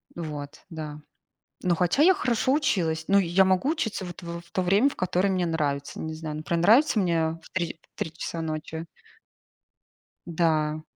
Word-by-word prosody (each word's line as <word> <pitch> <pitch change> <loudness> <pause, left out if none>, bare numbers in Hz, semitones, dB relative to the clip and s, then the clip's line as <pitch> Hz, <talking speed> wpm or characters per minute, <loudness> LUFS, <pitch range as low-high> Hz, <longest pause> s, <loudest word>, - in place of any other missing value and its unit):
Вот, 150 -4 -7
да. 155 -2 -6 0.6
Но 180 -1 +2
хотя 180 - +2
я 365 +5 +7
хорошо 250 -4 +1
училась. 175 - +1
Ну, 200 0 +5
я 185 +1 +3
могу 190 +9 +2
учиться 220 - -2
вот 175 0 -8
в 170 0 -6
в 170 - -23
то 185 - 0
время, 200 +9 +4
в - - -10
которое 185 +2 +1
мне 185 -2 +1
нравится, 145 -4 -2
не 160 0 -4
знаю. 155 -1 -5
Например, 165 +2 -1
нравится 230 - +5
мне 170 -3 +2
в - - -16
3- 170 -3 -2 0.2
в - - -16
3 160 - -2
часа 165 0 -5
ночи. 160 +1 -4 1.4
Да. 155 -2 +1
170 Hz, 175 wpm, -26 LUFS, 160-195 Hz, 1.4 s, я